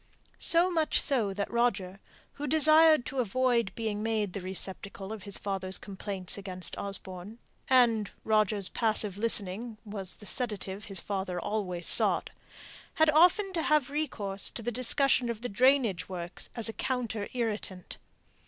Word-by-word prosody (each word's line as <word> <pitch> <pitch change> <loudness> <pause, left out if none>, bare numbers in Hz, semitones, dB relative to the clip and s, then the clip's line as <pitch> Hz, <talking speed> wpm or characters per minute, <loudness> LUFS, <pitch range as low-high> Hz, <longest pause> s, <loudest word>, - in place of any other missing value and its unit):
So 345 +2 +6
much 320 -3 +2
so 240 -9 +2
that 200 +1 -4
Roger, 210 -5 -1 0.3
who 295 +1 -6
desired 310 -1 +5
to 270 - -5
avoid 240 -2 0
being 215 -2 -3
made 215 -3 -2
the 200 - -5
receptacle 190 +2 -3
of 220 - -8
his 200 -1 -3
father's 190 -1 -3
complaints 195 -2 -4
against 185 -2 -5
Osborne 195 +1 -5 0.3
and 235 -5 +3
Roger's 215 -2 +1
passive 215 -3 +3
listening 220 0 +1
was 200 -3 -5
the 210 - -14
sedative 210 -4 -3
his 195 -3 -4
father 190 -2 -4
always 180 -3 -4
sought - - +2 0.6
had 315 -1 +4
often 360 +5 +3
to 335 - -1
have 300 -4 +1
recourse 205 -10 -2
to 230 - -7
the 240 - -2
discussion 255 +1 +2
of 230 -2 -5
the 245 - -4
drainage 240 -5 +2
works 175 -2 -4
as 230 -2 +3
a 225 - 0
counter 240 -6 -3
irritant. 210 -6 -5
215 Hz, 150 wpm, -29 LUFS, 195-255 Hz, 0.6 s, So